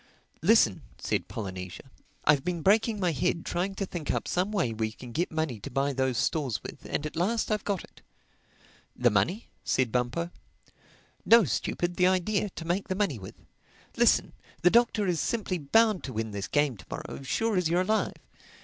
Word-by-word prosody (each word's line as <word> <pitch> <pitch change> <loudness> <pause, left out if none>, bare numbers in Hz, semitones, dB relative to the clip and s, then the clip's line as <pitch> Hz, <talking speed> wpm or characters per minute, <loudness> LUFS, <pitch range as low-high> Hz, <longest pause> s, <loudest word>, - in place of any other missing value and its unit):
"Listen," 165 - +4 0.2
said - - -2
Polynesia, 95 -4 -6 0.4
"I've 145 -2 +4
been 175 -3 -2
breaking 215 +2 +3
my 180 -3 +2
head 165 +3 -1
trying 190 +3 -2
to 195 - -2
think 175 -5 -6
up - - -1
some 185 +4 0
way 170 - 0
we 110 0 -2
can 120 +2 -11
get 170 +9 -1
money 160 -8 -2
to - - -7
buy 140 +1 0
those 130 -2 0
stores 135 -2 0
with; - - -9
and 150 - -2
at 150 - -5
last 215 +7 0
I've 210 - 0
got 200 -4 -2
it." - - -17 0.9
"The 120 -1 +3
money?" 170 - 0
said 130 -3 +1
Bumpo. 125 +8 -1 0.9
"No, 230 0 +7
stupid. 175 - -1
The 180 - +5
idea—to 185 -1 0
make 175 +4 -1
the 185 - -1
money 185 - 0
with. 95 - -10 0.6
Listen: - - +3 0.3
the 180 - +6
Doctor 235 -3 +3
is 175 -4 0
simply 200 -6 -1
bound 215 +7 +3
to 130 - -6
win 110 0 -3
this 100 -1 -4
game 145 -5 +1
to - - -14
morrow, - - -6
sure 215 - 0
as 180 -3 +2
you're 175 +2 +3
alive. 215 +4 +1
170 Hz, 185 wpm, -28 LUFS, 130-195 Hz, 0.9 s, No